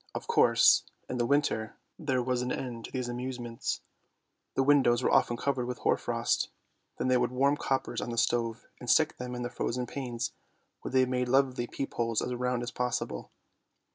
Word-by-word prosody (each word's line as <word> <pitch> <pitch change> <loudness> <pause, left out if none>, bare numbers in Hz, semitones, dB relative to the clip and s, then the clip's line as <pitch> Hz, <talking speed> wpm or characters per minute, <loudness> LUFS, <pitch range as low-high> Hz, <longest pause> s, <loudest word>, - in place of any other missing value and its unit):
Of - - -4
course - - +5 0.2
in 125 - -3
the 120 - +2
winter 140 -6 +1 0.2
there 135 -6 0
was 125 0 0
an 125 0 -2
end 120 -3 -4
to - - -10
these 125 -2 -2
amusements. 120 -1 -4 0.7
The 135 - +3
windows 130 -4 +4
were - - +2
often 120 - +3
covered 130 -1 -1
with 125 -1 -3
hoar - - +2
frost; - - 0 0.5
then - - -1
they 130 0 +4
would 125 0 +1
warm 135 +3 +2
coppers 135 -2 -1
on - - -4
the 115 - -4
stove 115 -1 0
and 125 - -6
stick 155 +4 +4
them 125 0 -5
on 125 - -4
the 120 - -2
frozen 125 0 -2
panes, 120 -2 -4 0.5
where - - -5
they 130 0 +4
made 125 -1 -1
lovely 130 -2 +2
peep 135 - -5
holes 115 -2 0
as 125 - -2
round 125 0 -1
as 120 - -4
possible. 125 -1 -2
125 Hz, 195 wpm, -30 LUFS, 120-130 Hz, 0.7 s, course